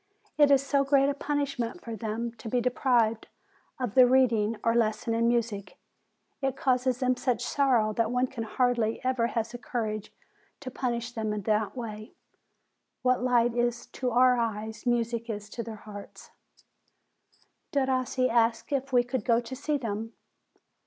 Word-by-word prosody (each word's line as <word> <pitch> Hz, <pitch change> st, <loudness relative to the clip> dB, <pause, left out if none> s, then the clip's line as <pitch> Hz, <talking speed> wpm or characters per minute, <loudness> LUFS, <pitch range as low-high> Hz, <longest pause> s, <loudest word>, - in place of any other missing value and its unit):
It 290 Hz, -1 st, +5 dB
is 275 Hz, -1 st, +4 dB
so 275 Hz, 0 st, +2 dB
great 275 Hz, 0 st, +3 dB
a -, -, +1 dB
punishment 280 Hz, -2 st, -2 dB
for 230 Hz, -1 st, -5 dB
them 225 Hz, +2 st, -3 dB
to 225 Hz, -, -6 dB
be 245 Hz, -, +1 dB
deprived 240 Hz, -2 st, +1 dB, 0.5 s
of 245 Hz, -5 st, -2 dB
the 255 Hz, -1 st, +7 dB
read 255 Hz, -1 st, +4 dB
ing, 215 Hz, +1 st, 0 dB
or 230 Hz, -, +3 dB
lesson 225 Hz, 0 st, +1 dB
in 230 Hz, +1 st, +2 dB
music, 220 Hz, -5 st, -1 dB, 0.6 s
it 270 Hz, -1 st, 0 dB
causes 255 Hz, -1 st, +1 dB
them 255 Hz, 0 st, +2 dB
such 245 Hz, -2 st, -1 dB
sorrow 245 Hz, -7 st, +2 dB
that 225 Hz, 0 st, +1 dB
one 250 Hz, +1 st, +1 dB
hardly 240 Hz, -2 st, 0 dB
ever 255 Hz, -2 st, +1 dB
has 230 Hz, -2 st, -2 dB
the 245 Hz, -, -7 dB
courage 215 Hz, -2 st, -3 dB, 0.5 s
to 260 Hz, -2 st, -6 dB
punish 235 Hz, -2 st, -2 dB
them 220 Hz, -3 st, -2 dB
in 210 Hz, -1 st, -4 dB
that 215 Hz, +3 st, 0 dB
way. 215 Hz, -1 st, -7 dB, 0.9 s
What 255 Hz, -1 st, +2 dB
light 240 Hz, -2 st, +3 dB
is 240 Hz, 0 st, 0 dB
to 255 Hz, -, -2 dB
our 250 Hz, +1 st, +4 dB
eyes, 220 Hz, 0 st, -3 dB
music 235 Hz, -1 st, 0 dB
is 210 Hz, -1 st, -5 dB
to 240 Hz, -, -4 dB
their 225 Hz, -1 st, -7 dB
hearts." 205 Hz, -1 st, -11 dB, 1.4 s
Derossi 260 Hz, -2 st, +1 dB
asked 230 Hz, +2 st, +1 dB
if 275 Hz, -1 st, -1 dB
we 245 Hz, -1 st, +4 dB
could 245 Hz, -2 st, -3 dB
go 230 Hz, +1 st, +3 dB
to 245 Hz, +2 st, -7 dB
see 290 Hz, +2 st, -1 dB
them. 225 Hz, -2 st, -4 dB
240 Hz, 165 wpm, -28 LUFS, 225-255 Hz, 1.4 s, the